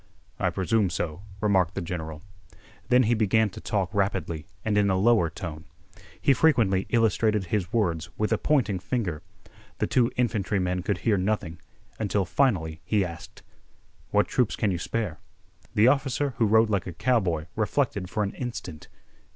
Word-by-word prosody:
"I -, -, +2 dB
presume 100 Hz, +1 st, +1 dB
so," 85 Hz, 0 st, -3 dB, 0.2 s
remarked 95 Hz, -5 st, +2 dB
the -, -, -1 dB
general. 80 Hz, -3 st, -5 dB, 0.7 s
Then 125 Hz, 0 st, +5 dB
he 115 Hz, +1 st, +2 dB
began 110 Hz, -1 st, +2 dB
to -, -, -10 dB
talk 95 Hz, -2 st, -1 dB
rapidly 95 Hz, -6 st, -1 dB, 0.2 s
and 110 Hz, -2 st, +1 dB
in 105 Hz, -1 st, +3 dB
a 95 Hz, -, +2 dB
lower 105 Hz, -4 st, +4 dB
tone. 80 Hz, -1 st, -7 dB, 0.5 s
He 140 Hz, -, +4 dB
frequently 115 Hz, -11 st, +3 dB
illustrated 110 Hz, -2 st, +2 dB
his 95 Hz, 0 st, -2 dB
words 85 Hz, -8 st, 0 dB
with 105 Hz, +1 st, +1 dB
a 110 Hz, -, 0 dB
pointing 125 Hz, -11 st, +1 dB
finger. 90 Hz, -, -2 dB, 0.6 s
The -, -, 0 dB
two 125 Hz, -2 st, +2 dB
infantrymen 100 Hz, -6 st, 0 dB
could 95 Hz, +1 st, -1 dB
hear 105 Hz, -3 st, +3 dB
nothing 90 Hz, -4 st, -2 dB, 0.4 s
until 100 Hz, -2 st, 0 dB
finally 85 Hz, -, 0 dB
he 105 Hz, -3 st, +1 dB
asked: 85 Hz, -2 st, -10 dB, 0.7 s
"What -, -, +2 dB
troops 125 Hz, -5 st, +1 dB
can 105 Hz, -4 st, 0 dB
you 90 Hz, -, -2 dB
spare?" 105 Hz, -4 st, -3 dB, 0.6 s
The 105 Hz, +3 st, +5 dB
officer 135 Hz, +1 st, +1 dB
who 115 Hz, -, +4 dB
rode 110 Hz, +1 st, +4 dB
like 100 Hz, -3 st, 0 dB
a 90 Hz, -, -5 dB
cowboy 90 Hz, -8 st, +1 dB
reflected 110 Hz, -3 st, -1 dB
for 105 Hz, -, -1 dB
an 100 Hz, -, -3 dB
instant. 115 Hz, -10 st, -6 dB
100 Hz, 160 wpm, -26 LUFS, 90-115 Hz, 0.7 s, Then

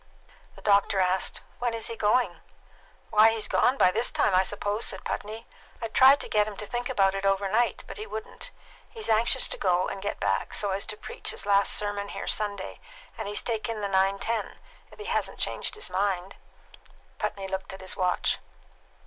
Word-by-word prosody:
The -, -, -15 dB
doctor 200 Hz, -1 st, +3 dB
asked, 185 Hz, 0 st, +1 dB, 0.2 s
"When 240 Hz, -1 st, 0 dB
is 225 Hz, -, -2 dB
he 230 Hz, -, -3 dB
going?" 210 Hz, -5 st, +2 dB, 0.7 s
"Why, 215 Hz, +1 st, +7 dB
he's 225 Hz, -1 st, -1 dB
gone 260 Hz, +2 st, +3 dB
by 185 Hz, -, +5 dB
this 225 Hz, +5 st, +1 dB
time, 200 Hz, -, +1 dB
I 185 Hz, -, +6 dB
suppose," 205 Hz, +3 st, -1 dB
said -, -, -3 dB
Putney. 220 Hz, +2 st, -5 dB, 0.3 s
"I 230 Hz, -, -4 dB
tried 265 Hz, +5 st, +7 dB
to -, -, -4 dB
get 210 Hz, -1 st, +2 dB
him 210 Hz, -2 st, -7 dB
to 210 Hz, -, -4 dB
think 240 Hz, +3 st, -3 dB
about 195 Hz, -6 st, +3 dB
it 195 Hz, 0 st, -3 dB
overnight, 195 Hz, +4 st, +1 dB
but -, -, -9 dB
he 430 Hz, +1 st, -6 dB
wouldn't. 460 Hz, +2 st, -7 dB, 0.4 s
He's 445 Hz, -2 st, -4 dB
anxious 230 Hz, +4 st, +3 dB
to -, -, -3 dB
go 180 Hz, -2 st, +2 dB
and 195 Hz, -, -5 dB
get 205 Hz, -, -3 dB
back, -, -, -1 dB
so 205 Hz, -2 st, +1 dB
as 195 Hz, +1 st, -2 dB
to 210 Hz, -1 st, -4 dB
preach -, -, -3 dB
his -, -, -2 dB
last 200 Hz, -1 st, +3 dB
sermon 205 Hz, -1 st, -2 dB
here -, -, -6 dB
Sunday, 205 Hz, -2 st, -2 dB, 0.4 s
and 220 Hz, -, -5 dB
he's 205 Hz, -, -2 dB
taken 225 Hz, -1 st, -2 dB
the 200 Hz, -, -1 dB
9.10, 195 Hz, +3 st, 0 dB, 0.4 s
if -, -, -15 dB
he 425 Hz, -, -8 dB
hasn't 465 Hz, -, -1 dB
changed -, -, -1 dB
his 430 Hz, -, -6 dB
mind." 195 Hz, -1 st, -1 dB, 0.8 s
Putney 195 Hz, -1 st, -3 dB
looked 190 Hz, 0 st, -4 dB
at 190 Hz, -, -9 dB
his 185 Hz, -, -4 dB
watch. 180 Hz, -1 st, +1 dB
205 Hz, 195 wpm, -27 LUFS, 195-230 Hz, 0.8 s, Why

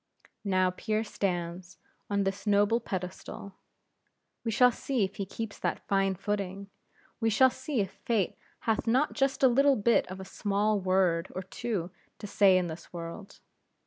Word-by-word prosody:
Now 185 Hz, -2 st, +2 dB
Pierre 215 Hz, +4 st, -1 dB
stands 180 Hz, -3 st, -3 dB, 0.3 s
on 200 Hz, -1 st, +1 dB
this 195 Hz, +1 st, -3 dB
noble 205 Hz, +3 st, +4 dB
pedestal; 190 Hz, -1 st, -6 dB, 0.9 s
we 230 Hz, -, -1 dB
shall 250 Hz, +3 st, +5 dB
see 250 Hz, -1 st, -1 dB
if 195 Hz, 0 st, -3 dB
he 195 Hz, -, -3 dB
keeps 220 Hz, +1 st, -6 dB
that -, -, -2 dB
fine 195 Hz, -1 st, +2 dB
footing; 195 Hz, 0 st, -3 dB, 0.5 s
we 225 Hz, -1 st, +2 dB
shall 260 Hz, +4 st, +5 dB
see 275 Hz, -5 st, -2 dB
if 195 Hz, -1 st, -3 dB
Fate 210 Hz, -2 st, -1 dB, 0.3 s
hath 225 Hz, 0 st, 0 dB
not 260 Hz, +6 st, +2 dB
just 270 Hz, -1 st, 0 dB
a -, -, +9 dB
little 275 Hz, +3 st, +4 dB
bit 230 Hz, +1 st, +3 dB
of 185 Hz, +1 st, -7 dB
a 190 Hz, -, -7 dB
small 205 Hz, +2 st, 0 dB
word 185 Hz, -3 st, +1 dB
or 185 Hz, -, -3 dB
two 190 Hz, -2 st, -3 dB, 0.3 s
to -, -, -8 dB
say 195 Hz, -2 st, +5 dB
in 180 Hz, -, +1 dB
this 165 Hz, -1 st, -8 dB
world. 175 Hz, +4 st, -8 dB
200 Hz, 165 wpm, -29 LUFS, 185-225 Hz, 0.9 s, a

